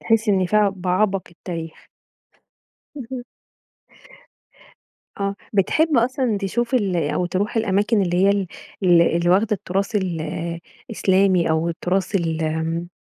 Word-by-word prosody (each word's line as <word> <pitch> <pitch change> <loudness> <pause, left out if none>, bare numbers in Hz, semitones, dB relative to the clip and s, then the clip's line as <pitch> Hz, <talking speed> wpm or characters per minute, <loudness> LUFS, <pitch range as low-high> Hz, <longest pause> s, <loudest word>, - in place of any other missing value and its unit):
تحس 225 0 +1
إن 190 -2 +3
فيها 210 +1 +3
بعبق 185 +2 0
التاريخ. 165 -2 -8 1.1
اهم. 250 -2 -6 2.0
آه، 200 0 -1 0.2
بتحب 300 - +2
أصلًا 240 -2 +1
تشوف 235 +6 -2
ال 200 -7 +1
أو 170 +2 0
تروح 195 +5 -2
الأماكن 205 0 +2
اللي 175 -1 0
هي 200 - +5
ال 200 -1 0 0.4
ال 175 -2 +5 0.2
اللي 170 +1 +1
واخدة 200 +4 +3
التراث 200 +2 -2
ال 180 -5 -2 0.7
الإسلامي 190 -5 +2
أو 160 +1 +1
التراث 185 +3 -2
ال 165 -3 0
آمم 160 +2 -2
195 Hz, 125 wpm, -21 LUFS, 175-215 Hz, 2.0 s, هي